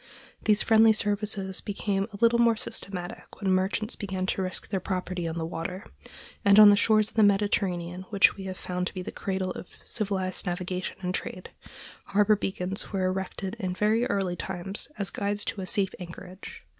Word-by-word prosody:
These 210 -1 +4
friendly 220 0 +6
services 205 -2 0
became 195 -1 -1
a 200 - -8
little 235 0 +5
more 235 -1 +5
systematic 195 -6 -5
when 195 -2 0
merchants 190 +4 0
began 190 -3 -3
to 190 - -1
risk 185 0 -3
their 195 - 0
property 180 -1 -3
on 165 0 -4
the 165 - -2
water; 180 +4 -5 0.6
and 200 -1 +6
on 210 -1 +11
the - - +6
shores 215 +1 +4
of - - -19
the 220 - +4
Mediterranean, 190 -3 +1
which 200 -2 +5
we 195 - -8
have 185 -1 -5
found 180 0 -3
to - - -8
be 185 - -4
the - - -6
cradle 190 -1 -2
of 180 - -7 0.2
civilized 195 -4 -1
navigation 180 +1 -3
and 180 -1 -2
trade, 185 0 -5 0.5
harbor 210 +1 +4
beacons 190 0 -4
were 190 -2 0
erected 190 +2 -3
in 185 -4 -2
very 220 +4 +2
early 190 -3 0
times 190 +2 -5
as 200 -2 0
guides 205 +1 -2
to 200 - -3
a 185 - -5
safe 190 -1 +1
anchorage. 180 +2 -10
195 Hz, 185 wpm, -27 LUFS, 185-205 Hz, 0.6 s, on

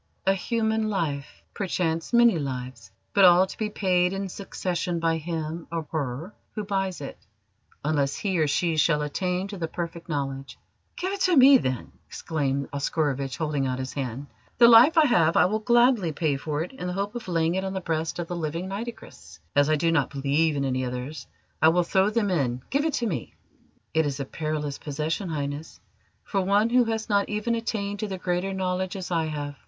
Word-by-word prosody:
"A 195 - +4
human 220 +2 0
life 150 -8 -3
perchance 170 -4 -2
many 235 -7 +5
lives 125 -6 -5 0.2
but 200 - +5
all 180 0 +7
to 190 - -9
be 215 -1 -2
paid 180 -3 +1
in 195 0 -3
succession 175 -2 -3
by 165 -1 +1
him 160 0 -4
or 165 -2 -3
her 155 +5 -3 0.2
who 215 - -2
buys 195 -4 -2
it, 140 - -7 0.7
unless 145 -3 +1
he 190 -4 -1
or 155 - +3
she 160 +3 +1
shall 150 -1 +3
attain 180 +5 -2
to 200 -2 -7
the 165 - -2
Perfect 170 0 -6
Knowledge." 135 -2 -4 0.4
"Give 375 +2 -2
it 400 - -5
to 365 -2 +4
me, 265 0 +8
then!" 130 - -3 0.2
exclaimed 140 -3 -2
Oscarovitch, 140 -2 -1
holding 150 -4 -1
out 130 0 -2
his 130 0 -5
hand. 135 0 -4 0.3
"The 235 - +8
life 240 +8 +8
I 315 - +7
have 170 - +3
I - - +6
will 215 +4 0
gladly 235 -5 +3
pay 150 -1 0
for 150 +2 -2
it 175 - -8
in 220 -9 -6
the 180 - -2
hope 200 +2 -2
of 240 -4 -7
laying 165 -1 +1
it 190 +1 -1
on 190 0 -3
the 190 - -2
breast 160 -2 -2
of 175 - -3
the 175 - -4
living 165 +2 -3
Nitocris. 200 - -8 0.2
As 145 +1 +4
I 155 - +4
do 165 +2 +1
not 150 -5 +2
believe 145 +3 +1
in 140 -1 -1
any 130 -1 -1
others, 125 +4 -5 0.3
I 160 - +7
will 175 +2 +3
throw 190 +3 +2
them 215 -2 0
in. 130 -7 0
Give 280 +3 +1
it 320 - 0
to 240 - 0
me!" 190 -9 -4 0.6
"It 160 -1 +2
is 140 -1 -3
a 140 - -2
perilous 150 -1 -3
possession, 155 +6 -3
Highness, 145 0 -4 0.4
for 195 - -1
one 205 +4 +2
who 250 0 +5
has 225 -1 -2
not 200 -2 +1
even 210 +2 -1
attained 205 -3 -2
to 215 - -2
the 190 -2 -4
Greater 180 +1 -1
Knowledge, 185 0 -2
as 185 -2 -6
I 165 -2 +1
have. 145 -2 -5
170 Hz, 205 wpm, -26 LUFS, 145-200 Hz, 0.7 s, me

